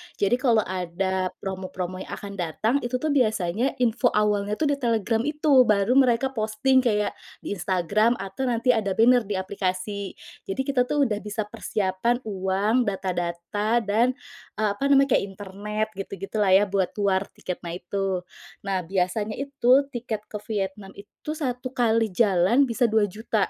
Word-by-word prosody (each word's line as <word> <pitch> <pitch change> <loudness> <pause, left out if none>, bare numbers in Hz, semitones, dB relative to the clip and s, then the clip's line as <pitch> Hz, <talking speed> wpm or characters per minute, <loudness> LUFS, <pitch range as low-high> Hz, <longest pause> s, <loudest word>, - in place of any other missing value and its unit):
Jadi, 225 +5 +1
kalau 230 -5 +3
ada 185 +1 -2 0.2
promo-promo 185 -1 -4
yang - - -7
akan 200 -2 -9
datang, 180 - 0
itu 245 -1 -3
tuh 310 +4 -1
biasanya 220 -2 +1
info 240 +1 +2
awalnya 210 -1 +1
tuh 290 +4 +1
di 280 - -1
Telegram 230 -3 +1
itu, 295 -4 +4
baru 215 +6 +4
mereka 260 +1 +3
posting 225 +3 +2
kayak 210 -5 +1 0.3
di - - -5
Instagram 200 +6 +2
atau 195 +6 -4
nanti 240 +1 +2
ada 205 -5 0
banner 240 -1 +4
di 205 - -2
aplikasi. 190 +1 -3 0.3
Jadi, 230 +8 -2
kita 255 -2 +1
tuh 290 +1 +2
udah 210 -5 0
bisa 210 +1 -3
persiapan 210 +3 -1
uang, 205 +4 0
data-data, 190 +4 -1
dan, 225 +5 +2 0.4
eee, 215 0 +1
apa 240 +8 -1
namanya, 275 -1 +4
kayak - - -4
internet 205 +2 -4
gitu-gitulah 195 0 0
ya, 200 - +6
buat 190 -2 0
war 195 0 +1
tiketnya 175 -2 -5
itu. 190 -1 -2 0.4
Nah, 195 -2 -1
biasanya 195 +3 -1
itu 275 0 +2
tiket 225 -4 -4
ke 210 - -4
Vietnam 195 -2 -4
itu, 300 +8 -8
1 255 -4 -4
kali 225 -4 +1
jalan 195 +4 +3
bisa 230 +1 +2
Rp2.000.000. 215 -2 0
210 Hz, 155 wpm, -25 LUFS, 195-245 Hz, 0.4 s, ya